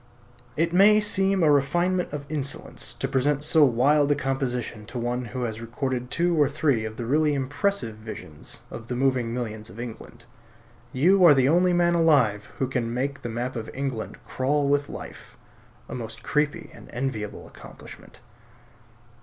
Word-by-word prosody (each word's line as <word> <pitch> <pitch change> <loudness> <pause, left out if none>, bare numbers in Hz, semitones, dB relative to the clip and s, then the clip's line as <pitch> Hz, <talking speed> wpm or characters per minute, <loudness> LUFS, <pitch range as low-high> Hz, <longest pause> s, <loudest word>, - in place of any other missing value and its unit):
It 165 +2 +1
may 205 +3 +6
seem 195 -3 +2
a 155 - +5
refinement 175 +6 +1
of 145 -1 -5
insolence 145 -2 -4
to 135 - -2
present 140 +2 +1
so 155 0 +5
wild 140 +4 +3
a - - +4
composition 130 -5 -2
to 125 - -7
one 120 +1 -2
who 125 +2 -5
has 110 -1 -4
recorded 125 +1 -3
two 175 +3 +1
or 140 - +4
three 140 -7 +1
of 110 0 -7
the 120 - -4
really 150 +4 +2
impressive 145 - -1
visions 110 -9 -8
of 115 0 -8
the 125 - -3
moving 130 -2 +1
millions 110 -3 -5
of 95 +6 -12
England. 120 -2 -9 0.7
You 180 +9 +4
are 160 -5 +8
the 130 -1 +3
only 180 +3 +4
man 175 0 +3
alive 140 -12 +3
who 130 - 0
can 125 -3 -2
make 140 +3 -2
the 120 - -5
map 120 +3 -3
of 115 -1 -5
England 135 -4 -4
crawl 140 +2 0
with 145 0 +1
life; - - -10 0.5
a - - -8
most 115 -3 -6
creepy 150 -1 -1
and - - -14
enviable 120 -4 -4
accomplishment. - - -13
135 Hz, 170 wpm, -25 LUFS, 120-150 Hz, 0.7 s, are